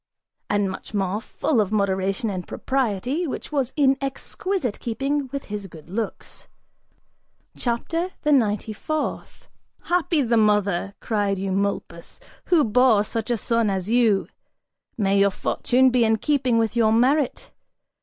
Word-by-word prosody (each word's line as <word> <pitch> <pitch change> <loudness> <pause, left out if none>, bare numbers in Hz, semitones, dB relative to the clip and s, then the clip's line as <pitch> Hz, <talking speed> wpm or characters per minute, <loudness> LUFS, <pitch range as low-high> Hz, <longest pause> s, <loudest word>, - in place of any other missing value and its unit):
And 205 -1 +1
much 200 - -8
more, 195 +1 -1
full 250 0 0
of 200 -1 -2
moderation 195 +1 0
and 185 -2 -5
propriety, 265 - -1
which 280 - -6
was 270 -4 0
in 275 -2 +3
exquisite 275 - -3
keeping 275 +4 -2
with 280 0 -5
his 205 -1 -6
good 165 -1 -14
looks. 220 +2 -5 1.1
CHAPTER 330 +9 -2
THE 300 - +2
NINETY 215 -5 +2
FOURTH. 310 +8 -4 0.4
"Happy 340 -4 +1
the 235 -1 +2
mother," 205 -3 +2
cried 205 -3 0
Eumolpus, 195 -2 -3 0.3
"who 340 -4 +4
bore 230 -2 +4
such 225 +1 -4
a 240 - +1
son 230 0 +1
as 190 +1 -2
you! 230 -5 +3 0.7
May 200 -2 +2
your 200 0 +5
fortune 255 +6 +2
be 245 -1 +3
in 220 0 +3
keeping 260 -2 +1
with 225 0 0
your 225 -2 +3
merit! 260 +5 +1
225 Hz, 140 wpm, -23 LUFS, 200-265 Hz, 1.1 s, your